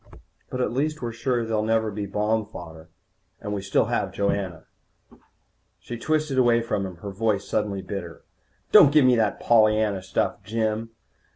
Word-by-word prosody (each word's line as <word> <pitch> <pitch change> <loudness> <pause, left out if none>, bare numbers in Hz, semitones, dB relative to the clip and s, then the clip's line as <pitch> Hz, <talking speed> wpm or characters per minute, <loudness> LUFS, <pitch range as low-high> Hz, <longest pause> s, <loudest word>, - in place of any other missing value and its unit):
But 130 - -3
at - - 0
least 150 +2 -1
we're 120 - -2
sure 120 +1 -1
they'll 110 -1 0
never 110 0 +1
be 100 0 -4
bomb 105 +2 0
fodder. 80 -2 -11 0.5
And 105 - -5
we 100 - -3
still 100 +3 +1
have 105 -4 -1
Joanna." 100 -3 -2 1.1
She 120 - -8
twisted 155 -1 0
away 120 -2 +4
from 100 -4 -2
him, 90 - -9
her 100 - -4
voice 100 0 -1
suddenly 100 -3 -2
bitter. 90 -4 -7 0.5
"Don't 140 - +8
give 150 -2 +5
me 125 -1 +5
that 110 -2 0
Pollyanna 110 -3 +3
stuff, 95 - -2
Jim. 110 +1 -2
110 Hz, 165 wpm, -24 LUFS, 100-120 Hz, 1.1 s, Don't